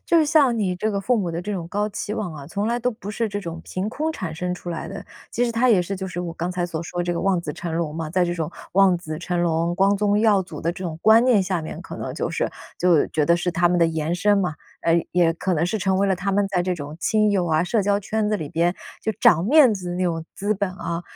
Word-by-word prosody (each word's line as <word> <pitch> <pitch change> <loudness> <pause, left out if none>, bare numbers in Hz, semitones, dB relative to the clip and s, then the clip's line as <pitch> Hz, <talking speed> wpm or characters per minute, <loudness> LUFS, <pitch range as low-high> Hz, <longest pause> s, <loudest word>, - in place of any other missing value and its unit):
就 340 - +4
是 315 - +3
像 285 -6 +4
你 190 -4 0
这 215 +4 -1
个 200 -1 -1
父 245 +5 +1
母 190 -6 -1
的 165 +1 -3
这 210 +4 -4
种 175 -4 -4
高 205 +3 -1
期 210 +1 -4
望 205 -6 -3
啊， 140 -2 -9
从 200 +6 -2
来 235 +1 0
都 245 +1 0
不 215 -3 -8
是 225 +1 -1
这 205 0 -4
种 170 -3 -6
凭 185 +3 -3
空 305 +7 -2
产 165 - -5
生 180 +2 -2
出 175 0 -7
来 170 - -5
的， - - -7 0.3
其 245 - 0
实 235 - -1
它 235 +3 +2
也 210 -6 +5
是 180 +3 -3
就 190 0 -5
是 175 - -6
我 175 -2 -4
刚 170 +2 -3
才 180 -1 -2
所 165 -2 -4
说 175 +1 -4
这 175 0 -1
个 170 - -2
望 195 -2 +1
子 155 -3 -5
成 170 +2 -5
龙 160 -3 -2
嘛， 160 -1 -4
在 180 +1 +2
这 175 0 -1
种 165 -2 -3 0.2
望 190 -1 +5
子 155 -2 -6
成 175 0 -2
龙、 170 0 +1
光 195 +2 +3
宗 205 0 +2
耀 210 -3 +4
祖 185 - -9
的 170 - -1
这 180 - -9
种 160 -2 -4
观 225 +2 +6
念 245 -5 +4
下 185 -2 -1
面， 155 - -7
可 - - -8
能 - - -5
就 - - -2
是 - - -1 0.3
就 175 -4 +4
觉 155 - +1
得 170 - +4
是 175 +1 -1
他 170 +1 +3
们 175 0 +2
的 170 - +5
延 160 0 -2
伸 205 +4 +3
嘛， 180 -5 0 0.3
呃， 165 - +2 0.2
也 170 -2 +3
可 185 +2 -1
能 160 0 +1
是 190 +5 -1
成 190 -1 +1
为 200 - +2
了 190 - +2
他 195 +3 -2
们 200 +1 +2
在 195 -3 0
这 180 0 -1
种 150 -2 -7
亲 215 +4 +2
友 190 -3 +1
啊， 160 0 +2
社 210 +4 +1
交 200 +1 +1
圈 215 +1 -1
子 210 - +1
里 155 -7 -5
边， 170 +2 +1 0.3
就 220 - -1
长 180 -9 +5
面 270 +1 +6
子 185 -3 -4
的 - - -3
那 180 - -1
种 165 -3 -1
资 205 +2 -1
本 200 0 -1
啊。 170 -2 -4
185 Hz, 320 characters per minute, -23 LUFS, 170-205 Hz, 0.3 s, 观